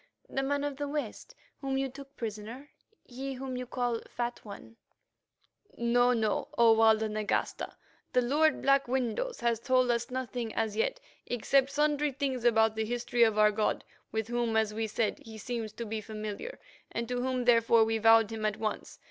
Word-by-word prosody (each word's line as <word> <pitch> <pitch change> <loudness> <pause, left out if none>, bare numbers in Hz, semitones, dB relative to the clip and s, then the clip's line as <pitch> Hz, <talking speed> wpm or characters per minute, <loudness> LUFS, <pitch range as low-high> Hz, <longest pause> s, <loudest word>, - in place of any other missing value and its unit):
"The 270 - -2
man 285 +1 -1
of 290 -2 -3
the 290 0 -3
West 295 - -5 0.2
whom 270 -1 -2
you 270 0 0
took 275 +1 -12
prisoner—he 250 - -8
whom 260 0 -5
you 250 0 -5
call 245 -2 -1
Fat 240 0 -3
One?" 215 +2 -11 1.0
"No, 245 +1 +3
no, 220 -4 0
O 230 -1 +7
Walda 220 0 +4
Nagasta, 215 -1 -2 0.4
the 250 - +3
lord 300 +4 +2
Black 275 -1 +3
Windows 260 - -2
has 235 -2 +1
told 255 0 +2
us 235 +1 -1
nothing 245 -3 -4
as 220 -2 -1
yet, - - 0 0.3
except 265 +3 +2
sundry 295 0 +1
things 260 -3 -2
about 220 -2 +4
the 220 0 -1
history 240 +1 -1
of 220 -2 +5
our 210 0 +6
god, 210 0 0 0.3
with 220 -1 -2
whom, 240 -1 0
as 220 -1 +1
we 220 +1 -2
said, 215 0 -1
he 220 -1 -11
seems 225 0 -4
to 235 - -6
be 220 0 -4
familiar, 215 - -6 0.3
and 235 0 -3
to 245 0 -2
whom, 255 -1 -1
therefore, 230 -1 +5
we 225 0 0
vowed 225 -1 +5
him 220 -1 -5
at 215 -1 0
once. 215 -1 -4
240 Hz, 180 wpm, -30 LUFS, 220-265 Hz, 1.0 s, O